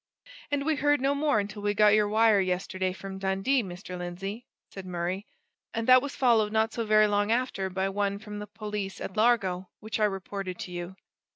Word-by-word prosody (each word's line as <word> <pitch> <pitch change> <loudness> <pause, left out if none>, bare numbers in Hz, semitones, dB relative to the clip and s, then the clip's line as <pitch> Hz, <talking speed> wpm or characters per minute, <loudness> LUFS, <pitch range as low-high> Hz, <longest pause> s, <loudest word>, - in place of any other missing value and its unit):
"And 285 -1 -1
we 315 -1 +1
heard 290 +1 +3
no 275 +2 +2
more 290 -4 +2
until 205 +1 -4
we 205 0 0
got 210 0 +6
your 210 -1 +4
wire 215 0 +4
yesterday 185 0 -1
from 190 +1 -8
Dundee, 195 +8 +1
Mr. 180 -2 -8
Lindsey," 195 +6 -6 0.2
said 195 - -8
Murray; 180 +2 -3 0.5
"and 225 0 -2
that 255 0 +8
was 285 +1 -5
followed 225 -5 +3
not 220 0 +1
so 230 - -2
very 215 0 +6
long 205 +1 +1
after 230 -6 0
by 190 +1 -1
one 200 0 -1
from 210 0 -8
the 210 - -7
police 210 -2 -5
at 190 - -6
Largo, 195 -5 +2
which 220 +1 -4
I 215 - +4
reported 195 -2 -4
to 180 - -6
you." 175 +1 -6
205 Hz, 200 wpm, -28 LUFS, 190-225 Hz, 0.5 s, that